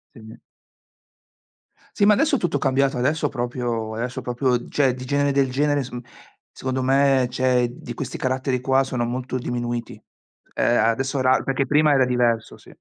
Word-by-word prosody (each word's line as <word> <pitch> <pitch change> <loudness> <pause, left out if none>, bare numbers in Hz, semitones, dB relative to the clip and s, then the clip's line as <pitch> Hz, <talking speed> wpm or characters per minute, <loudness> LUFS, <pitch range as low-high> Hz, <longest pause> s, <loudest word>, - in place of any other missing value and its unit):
Sì. 110 -1 -12 1.6
Sì, 205 - +2
ma 210 - +6
adesso 300 +6 +2
è - - +2
tutto 165 -5 0
cambiato, 135 -1 +1
adesso 145 +6 0
proprio 120 -3 -3
adesso 120 +3 -4
proprio, 125 0 -1
cioè 135 -4 +1
di 130 0 -8
genere 140 +1 +1
del 135 -1 +2
genere 145 +2 +1
s 130 - -7
mhmm, 120 0 -6 0.5
secondo 130 0 -3
me, 135 -1 +3
cioè 125 -1 +1
di 120 -1 -9
questi 130 +2 -5
caratteri 130 0 -1
qua 135 +1 +2
sono 125 -3 -2
molto 130 +1 -3
diminuiti. 120 -1 -4 0.6
Ehm, 120 - +2
adesso 135 +4 0
era 130 0 +3
perché 135 0 -1
prima 150 +1 +3
era 135 -1 +4
diverso, 120 -3 0
sì. - - -17
130 Hz, 170 wpm, -22 LUFS, 120-135 Hz, 1.6 s, ma